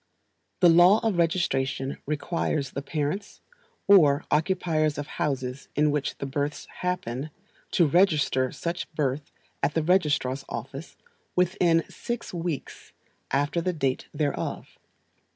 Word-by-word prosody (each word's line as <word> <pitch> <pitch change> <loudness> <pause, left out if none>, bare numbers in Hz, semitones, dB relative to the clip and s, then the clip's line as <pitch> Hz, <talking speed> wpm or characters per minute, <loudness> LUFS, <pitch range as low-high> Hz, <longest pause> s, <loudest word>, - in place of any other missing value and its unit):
The 175 - +8
law 175 +5 +7
of 205 -6 +1
registration 135 -6 0
requires 150 -1 -1
the 140 - -4
parents, 155 +7 -3 0.5
or 150 -8 +6
occupiers 155 -2 +1
of 145 - -3
houses 135 -2 -3
in 150 0 +3
which 145 -1 -2
the - - -4
births 145 +2 -3
happen, 155 -6 -2 0.4
to 175 - +5
register 150 -6 +3
such 170 +1 -4
birth 145 -1 -1 0.3
at 145 - 0
the 160 - +2
registrar's 150 -6 +1
office 135 +7 -7 0.4
within 175 -2 +3
six 240 -4 -5
weeks 170 -5 -5 0.4
after 145 +5 +1
the 180 +2 -1
date 135 -5 -1
thereof. 145 -2 -3
150 Hz, 120 wpm, -26 LUFS, 140-175 Hz, 0.5 s, The